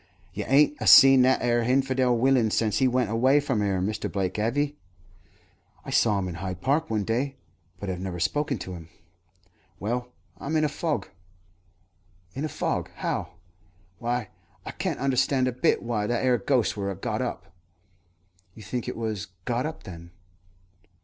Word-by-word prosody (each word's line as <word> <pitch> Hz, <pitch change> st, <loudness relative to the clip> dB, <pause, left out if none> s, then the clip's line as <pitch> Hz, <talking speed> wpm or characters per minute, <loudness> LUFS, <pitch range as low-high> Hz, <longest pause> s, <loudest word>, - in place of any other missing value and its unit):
"You -, -, -4 dB
ain't 145 Hz, +2 st, +4 dB
a -, -, -1 dB
seen 135 Hz, -2 st, +9 dB
that 130 Hz, +1 st, +3 dB
'ere 120 Hz, -1 st, +2 dB
hinfidel 130 Hz, 0 st, +2 dB
willain 125 Hz, -2 st, +3 dB
since 105 Hz, -1 st, +1 dB
he 130 Hz, -, +4 dB
went 125 Hz, -4 st, 0 dB
away 130 Hz, +5 st, +4 dB
from 135 Hz, -7 st, -1 dB
'ere, 100 Hz, -2 st, 0 dB
Mr. 105 Hz, +4 st, -2 dB
Blake, 95 Hz, -1 st, -2 dB
have 115 Hz, +6 st, -1 dB
'ee?" 145 Hz, 0 st, 0 dB, 1.1 s
"I -, -, -6 dB
saw 105 Hz, -3 st, +3 dB
him 95 Hz, -1 st, -2 dB
in 90 Hz, -, -5 dB
Hyde 95 Hz, -1 st, -4 dB
Park 145 Hz, +9 st, 0 dB
one 110 Hz, -2 st, 0 dB
day, 130 Hz, +6 st, -1 dB, 0.4 s
but 100 Hz, -, -6 dB
have 90 Hz, -2 st, -3 dB
never 90 Hz, -2 st, -5 dB
spoken 145 Hz, -, 0 dB
to 95 Hz, -1 st, -7 dB
him." 85 Hz, -2 st, -10 dB, 0.9 s
"Well, 120 Hz, +4 st, -3 dB, 0.3 s
I'm 155 Hz, +3 st, -3 dB
in 155 Hz, -, +3 dB
a 150 Hz, -, +2 dB
fog." 145 Hz, -, -2 dB, 1.2 s
"In 135 Hz, -, -4 dB
a 155 Hz, -, -2 dB
fog! -, -, -2 dB
How?" -, -, -3 dB, 0.7 s
"Why, 120 Hz, -2 st, -2 dB, 0.4 s
I -, -, -5 dB
can't -, -, -3 dB
understand 130 Hz, 0 st, +1 dB
a -, -, +1 dB
bit 125 Hz, -, +1 dB
why 110 Hz, -3 st, -1 dB
that 120 Hz, +1 st, 0 dB
'ere 125 Hz, -2 st, +3 dB
ghost 125 Hz, +1 st, +1 dB
wur 100 Hz, -1 st, -3 dB
a 100 Hz, -, -4 dB
got 105 Hz, +4 st, -3 dB
up." 100 Hz, -7 st, -5 dB, 1.0 s
"You 110 Hz, -, -11 dB
think 120 Hz, +4 st, -4 dB
it -, -, -4 dB
was 110 Hz, -3 st, -3 dB, 0.2 s
got 125 Hz, +3 st, -1 dB
up, 160 Hz, -, -8 dB
then?" 85 Hz, -1 st, -10 dB
120 Hz, 175 wpm, -26 LUFS, 100-135 Hz, 1.2 s, seen